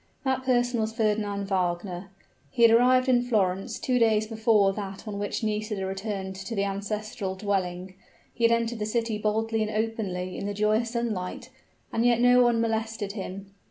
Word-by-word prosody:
That 265 -1 0
person 245 -2 +1
was 220 0 -2
Fernand 210 -3 0
Wagner. 180 0 -2 0.4
He 235 - +1
had 230 - +8
arrived 255 +2 +5
in 250 -2 +4
Florence 195 -6 0
two 250 -1 0
days 220 -2 +3
before 220 -3 +3
that 195 +1 -7
on 205 -1 -4
which 205 +2 -3
Nisida 210 -2 -2
returned 195 0 -4
to 195 +4 -5
the 200 - +1
ancestral 200 -1 -3
dwelling: 185 -2 -2 0.4
he 235 - -5
had 230 - +6
entered 230 0 0
the 210 - -2
city 225 -1 -1
boldly 220 +1 0
and 215 - 0
openly 210 -5 -2
in 200 - -3
the 205 - -3
joyous 215 +3 +1
sun 235 -1 -1
light 220 +7 -6 0.4
and 225 - +1
yet 240 -1 +4
no 245 +1 +6
one 240 -1 +3
molested 225 -2 -2
him. 195 -1 -7
215 Hz, 180 wpm, -27 LUFS, 195-230 Hz, 0.4 s, had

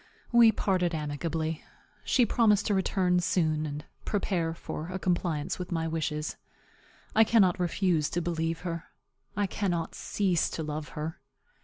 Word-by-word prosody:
We 235 -2 +7
parted 180 -5 0
amicably. 155 +1 -2 0.4
She 250 - +3
promised 215 -3 +3
to 210 - +1
return 185 -2 +2
soon 155 -3 +1
and 150 +1 -6 0.2
prepare 175 -5 -1
for 160 -1 -6
a 185 +1 -4
compliance 175 -5 -1
with 180 - -5
my 165 -1 0
wishes. 155 -1 -2 0.8
I 220 - +8
cannot 200 -5 +4
refuse 175 -3 +1
to 175 - -1
believe 165 -1 -2
her. 170 -2 -4 0.5
I 205 - +2
cannot 175 -4 -2
cease 185 -5 0
to 160 - -3
love 150 0 -4
her. 155 +2 -4
170 Hz, 145 wpm, -29 LUFS, 160-190 Hz, 0.8 s, I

